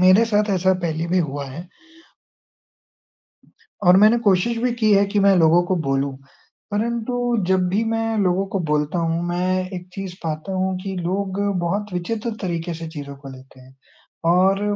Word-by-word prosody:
मेरे 185 +5 +6
साथ 210 -1 +1
ऐसा 185 +1 +2
पहले 160 +1 -2
भी 185 +2 +2
हुआ 140 0 -4
है। 170 +6 -9 2.2
और 180 +1 +7
मैंने 215 +4 +6
कोशिश 200 +5 +3
भी 245 +1 0
की 220 -3 +2
है 200 0 +5
कि 205 +1 -1
मैं 200 0 +5
लोगों 165 +1 +5
को 185 - 0
बोलूँ 135 0 -1 0.5
परंतु 235 +3 -2 0.3
जब 185 -1 +2
भी 200 +5 +1
मैं 225 0 -1
लोगों 190 0 +1
को 195 - 0
बोलता 150 +3 0
हूँ, 165 0 0
मैं 185 +1 -1
एक 180 0 -7
चीज़ 195 -2 -6
पाता 160 +4 -4
हूँ 190 0 -1
कि 195 -1 -4
लोग 190 +2 -2 0.2
बहुत 200 +4 -2
विचित्र 215 +6 -3
तरीके 170 -2 -3
से 165 0 -7
चीज़ों 145 -3 -8
को 140 0 -12
लेते 130 0 -14
हैं। 130 +1 -18 0.5
और 190 +3 +3
185 Hz, 170 wpm, -21 LUFS, 165-205 Hz, 2.2 s, और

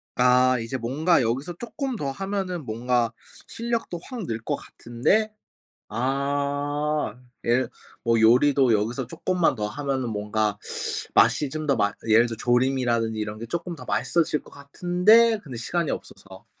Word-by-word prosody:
아 125 0 +4
이제 115 +3 -3
뭔가 140 +8 +2
여기서 135 +9 -2
쪼끔 265 +2 -4
더 140 -10 -3
하면은 190 -2 -3
뭔가 120 +1 0 0.4
실력도 230 -7 -3
확 245 -5 -6
늘 115 -1 -2
거 - - -1
같은데 195 - -1 0.6
아. 140 +2 -1 0.3
예 120 +2 +3 0.4
뭐 115 -1 +3
요리도 130 +3 +5
여기서 115 +4 0
쪼끔만 175 +2 0
더 105 -3 -2
하면은 135 0 -2
뭔가 105 0 -1 0.6
맛이 115 +7 +4
좀 155 +2 -4
더 140 -2 +2
맛 105 -1 +1
예를 110 +2 +6
들어 115 -2 -5
조림이라든지 120 -2 +1
이런 105 0 -4
게 115 - -6
쪼끔 170 +6 -4
더 130 - -10
맛있어질 160 -3 0
거 - - -17
같은데 180 +10 +3
근데 130 -6 -8
시간이 170 +7 -1
없어서 - - -8
135 Hz, 290 characters per minute, -25 LUFS, 115-165 Hz, 0.6 s, 예를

